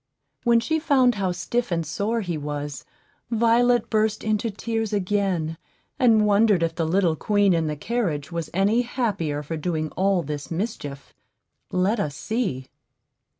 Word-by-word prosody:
When 235 -1 +5
she 315 +7 0
found 265 -5 +4
how 195 -3 -1
stiff 210 +7 -2
and 165 -1 0
sore 215 +9 -1
he 175 -4 -3
was, 145 -1 -5 0.4
Violet 235 +1 +3
burst 215 -1 +1
into 215 +1 0
tears 225 +1 -3
again, 185 -5 0 0.4
and 225 -5 +5
wondered 205 -3 +4
if 165 -1 0
the 165 -1 -1
little 175 -1 +2
queen 205 +2 +2
in 165 -2 +1
the 150 - -2
carriage 165 -5 -2
was 170 -2 -4
any 200 +6 +2
happier 200 - -2
for 160 +3 -4
doing 155 -1 -2
all 190 -2 +1
this 145 -1 -5
mischief. 165 -7 -5 0.6
Let 190 +5 +1
us 150 -8 -2
see. 190 - -2
195 Hz, 150 wpm, -24 LUFS, 160-225 Hz, 0.6 s, When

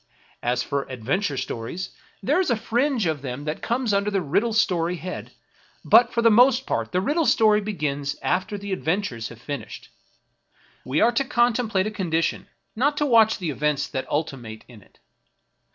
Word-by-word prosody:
As 120 0 0
for 140 -1 -3
adventure 135 - -2
stories, 125 +11 -5 0.3
there 295 - +2
is 375 - +1
a 240 - +3
fringe 240 +1 0
of 155 -4 -1
them 135 +1 -5
that 150 +1 -4
comes 240 -2 0
under 200 +1 +1
the 200 -1 0
riddle 190 +8 0
story 180 -5 +1
head; 180 +2 -7 0.5
but 240 0 +6
for 235 - 0
the 230 - +6
most 250 +3 +5
part - - -2
the 180 - +1
riddle 295 - +1
story 215 -2 +4
begins 145 -9 -3
after 205 +3 -1
the 200 -1 -5
adventures 165 - -2
have 115 - -12
finished. 140 +2 -7 0.9
We 135 +4 0
are 235 - +5
to 240 +4 +1
contemplate 240 -7 +1
a 215 - -2
condition, 165 -5 -1 0.3
not 285 +6 +1
to 295 - +1
watch 225 -4 +5
the 170 -5 -3
events 150 0 -1
that 130 - -4
ultimate 125 -8 -4
in 115 -4 -14
it. - - -24
190 Hz, 175 wpm, -24 LUFS, 145-230 Hz, 0.9 s, but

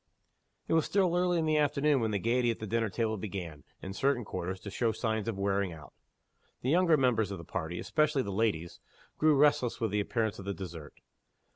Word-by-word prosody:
It - - 0
was 160 -1 +3
still 185 -3 +2
early 180 0 +2
in 160 - +1
the 155 -1 +2
afternoon 145 -1 +2
when 110 - +1
the 105 - 0
gayety 120 +4 +1
at 115 - -1
the 110 - -6
dinner 115 +1 0
table 110 +2 -1
began, 90 -7 -6 0.2
in 95 - -5
certain 125 +2 +1
quarters, 95 0 -4
to 100 - -7
show 115 +2 +1
signs 110 -1 -2
of 115 -4 -2
wearing 100 -1 0
out. 75 -2 -13 0.7
The 130 - +1
younger 170 -1 +4
members 120 -6 +2
of 100 - -5
the 85 - -9
party 85 0 -4
especially 150 - +1
the 100 - -4
ladies 95 -5 -1 0.4
grew 155 -1 +5
restless 140 -4 +3
with 115 -3 -1
the 105 - +1
appearance 110 0 -1
of 95 - -8
the 100 -1 -3
dessert. 85 -6 -8
110 Hz, 215 wpm, -30 LUFS, 95-140 Hz, 0.7 s, grew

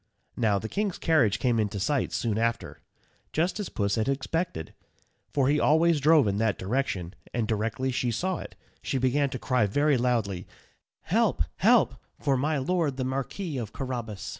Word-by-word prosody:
Now, 110 -4 +2
the 110 - -4
king's 200 - -2
carriage 120 -11 +3
came 120 0 +1
in 105 -1 +1
sight 120 +8 -1
soon 110 -2 -1
after, 115 0 -2 0.5
just 175 +6 0
as 205 - -3
Puss 100 -1 -1
had 110 +3 0
expected, 135 - -2 0.6
for 135 -2 +1
he 150 +2 +3
always 160 +2 +4
drove 150 -3 +5
in 100 0 0
that 110 -2 +1
direction, 95 -5 -2 0.2
and 115 -3 0
directly 115 +5 -1
she 125 0 0
saw 180 +10 -1
it, - - -9 0.3
she 135 - -2
began 135 +2 +2
to 130 - -4
cry 125 -4 +1
very 145 +5 +2
loudly, 115 -7 0 0.5
"Help, - - +1
help, - - +4 0.2
for 140 - +1
my 150 +4 0
Lord 145 -1 0
the 130 - -1
Marquis 135 +4 -3
of 110 -3 -6
Carrabas." 120 -6 -5
130 Hz, 170 wpm, -27 LUFS, 110-145 Hz, 0.6 s, drove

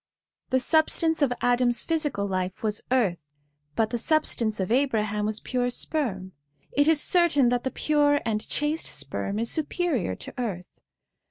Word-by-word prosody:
The 260 - +2
substance 320 +3 +2
of 280 -3 +3
Adam's 245 0 +2
physical 295 -11 -1
life 185 0 -3
was 210 -1 -1
earth, 185 - 0 0.5
but 220 -1 +1
the 240 - -1
substance 235 -7 +1
of 190 +2 -2
Abraham 215 -5 +1
was 215 0 -2
pure 250 -1 -1
sperm; 225 -9 -2 0.4
it 285 +1 +2
is 320 -2 +5
certain 300 -7 +4
that 245 0 0
the 260 - -1
pure 290 0 +2
and 215 -2 0
chaste 300 +2 -1
sperm 140 - -3
is 230 +1 -1
superior 310 - -1
to - - -9
earth. 190 -7 -5
245 Hz, 155 wpm, -26 LUFS, 210-295 Hz, 0.5 s, is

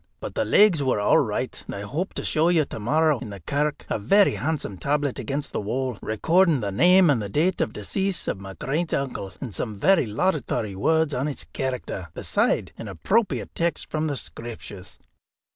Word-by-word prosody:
But - - -6
the - - 0
legs 200 -7 +5
were 130 -6 +1
all 105 - +4
right. - - -2
And - - -5
I 100 - -5
hope 155 - -4
to - - -3
show 160 +2 +2
you 165 -4 +3
to - - -7
morrow, 150 +5 +2
in 120 - -7
the 100 -1 -8
kirk, 145 - -2
a - - -1
very 195 - +4
handsome 145 - -3
tablet 145 -2 0
against 140 +1 -3
the - - -2
wall, 125 +1 -2
recording 165 - +2
the 100 -3 -2
name 175 - +5
and 120 -6 +1
the 100 - -4
date 170 - +1
of - - 0
decease 180 - -2
of - - -2
my 95 -1 -8
great 155 - -1
uncle, 130 -8 -3
and 125 -7 -6
some 105 +3 -4
very 175 - +3
laudatory 115 - -1
words 160 +8 +2
on 130 +3 -1
his 145 - -4
character, 125 -8 -3
beside - - 0
an - - -6
appropriate 205 - 0
text 170 0 -1
from 155 0 0
the 145 -2 -2
Screeptures." 110 -5 -8
140 Hz, 195 wpm, -24 LUFS, 105-160 Hz, -, legs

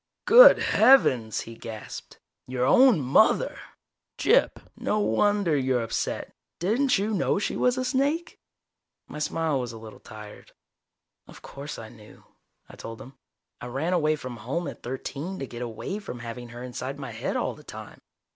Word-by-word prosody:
"Good - - +9
heavens," 135 - +4
he 115 - -9
gasped. 110 -1 -9 0.3
"Your 125 0 -1
own 250 - +5
mother! 140 - +3 0.6
Gyp, - - +3 0.2
no 210 - -1
wonder 205 -5 +2
you're 130 -3 0
upset. 115 - -4 0.2
Didn't 240 +9 +1
you 205 +3 -1
know 195 - +1
she 205 - -2
was 250 0 +1
a 255 - -1
snake?" 285 +6 -1 0.7
My - - -8
smile 155 -1 -1
was 125 -2 -4
a - - -9
little 110 -1 -12
tired. 105 -1 -12 0.7
"Of - - -15
course 140 +2 -8
I 110 - -9
knew," 105 -1 -16 0.4
I - - -13
told 115 0 -8
him. 130 - -12 0.5
"I - - -6
ran 140 +8 -2
away 155 -3 +2
from 130 -5 -8
home 140 +10 -4
at - - -8
thirteen 140 +8 -5
to 135 - -4
get 120 -2 -9
away 120 - -5
from 195 -12 -8
having 120 +1 -8
her 120 +1 -9
inside 125 +2 -6
my 140 - -7
head - - -4
all - - -1
the - - -16
time. - - -11
140 Hz, 165 wpm, -26 LUFS, -, 0.7 s, Good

